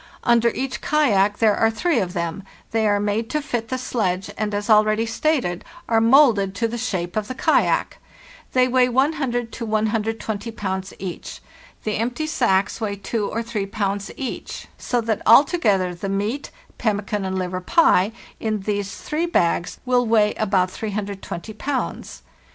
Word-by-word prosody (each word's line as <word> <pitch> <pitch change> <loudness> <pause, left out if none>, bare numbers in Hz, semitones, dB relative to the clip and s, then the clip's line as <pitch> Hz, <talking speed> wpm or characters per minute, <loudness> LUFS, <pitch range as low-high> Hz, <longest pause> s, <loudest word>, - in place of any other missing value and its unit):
Under 235 -1 +4
each 260 -4 -3
kayak 210 -10 +2
there 215 -2 +4
are 225 - +3
three 260 +5 +1
of 180 -3 -2
them, 170 0 -3 0.3
they 225 -1 +2
are 205 0 +2
made 210 +2 -1
to 305 - 0
fit 240 -6 -3
the 255 - -1
sledge, 195 -7 -2
and, 215 0 -2
as 205 0 -3
already 215 0 +4
stated, 230 - 0 0.2
are 225 -1 +3
moulded 225 -6 +5
to 230 +2 0
the 230 - -5
shape 185 -7 -3
of 215 -1 -1
the 255 - -5
kayak. 315 +4 +1 0.5
They 255 -1 +4
weigh 255 0 +3
1too 255 -2 0
to 230 - -6
120 220 0 -1
pounds 190 -3 -3
each. 180 -2 -7 0.4
The 215 - -1
empty 245 +7 -2
sacks 195 -9 +1
weigh 205 -2 -1
2 205 +1 -2
or 230 - -2
3 215 -4 -3
pounds 200 0 -2
each, 265 -3 -6
so 245 -1 -1
that 220 -2 -1
alto 280 - +6
gether 190 - +2
the 185 +3 -5
meat 210 +8 -2 0.3
(pemmican 210 -2 -1
and 190 0 -2
liver 185 0 -3
pie) 210 - +4 0.3
in 215 -2 -2
these 200 0 -2
three 320 +3 -2
bags 170 - 0
will 250 -1 +2
weigh 215 -2 +3
about 190 -3 +1
320 205 -1 -5
pounds. 265 +5 -4
215 Hz, 165 wpm, -22 LUFS, 200-245 Hz, 0.5 s, alto